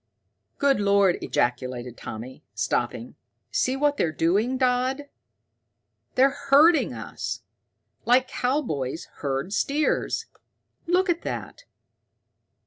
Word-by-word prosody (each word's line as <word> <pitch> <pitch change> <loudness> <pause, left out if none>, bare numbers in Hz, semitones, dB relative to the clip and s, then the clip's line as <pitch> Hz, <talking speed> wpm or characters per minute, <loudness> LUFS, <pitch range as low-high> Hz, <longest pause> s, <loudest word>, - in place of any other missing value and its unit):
"Good 280 -5 +3
Lord!" 200 -2 +3
ejaculated 125 0 -1
Tommy, 120 +4 -8
stopping. - - -2 0.4
"See 255 - +1
what 290 +1 +1
they're 165 - +1
doing, 200 - +1
Dodd? 255 +2 0 1.1
They're 270 +2 +5 0.2
herding 310 +4 +6
us, - - -6 0.6
like 255 +2 +4
cowboys 200 - -2
herd 140 +6 -2
steers. 295 +7 0 0.6
Look 365 +3 +3
at 345 -1 0
that!" - - -6
250 Hz, 95 wpm, -25 LUFS, -, 1.1 s, herding